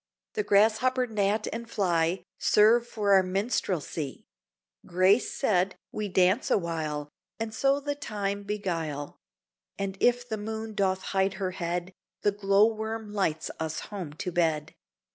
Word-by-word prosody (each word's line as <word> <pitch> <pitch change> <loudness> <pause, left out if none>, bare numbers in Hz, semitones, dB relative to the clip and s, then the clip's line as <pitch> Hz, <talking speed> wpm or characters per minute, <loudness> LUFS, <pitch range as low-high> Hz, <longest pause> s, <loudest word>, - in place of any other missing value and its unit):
The 440 - 0
grasshopper, 225 - +3
gnat, 215 -1 0
and 230 0 -6
fly 175 -3 +1 0.2
Serve 230 +3 +5
for 205 -4 +1
our 190 - +7
minstrelsy; 185 - -2 0.6
Grace 185 +6 +3
said, 195 -7 +1 0.2
we 210 -1 -3
dance 185 +4 +3
awhile, 155 -5 -1 0.3
And 225 -1 -3
so 275 +4 +2
the 290 0 -2
time 205 -8 -3
beguile: 170 -8 -3 0.6
And 195 -1 -3
if 245 0 +2
the 220 -2 -3
moon 220 +1 -5
doth 190 -2 0
hide 190 0 +2
her 190 -1 -2
head, 175 0 -3 0.3
The 205 - +4
glow 200 0 +4
worm 220 -1 -3
lights 165 -6 -1
us 160 -1 -2
home 180 -8 -5
to 180 +4 -4
bed. 160 -3 0
200 Hz, 140 wpm, -28 LUFS, 180-220 Hz, 0.6 s, our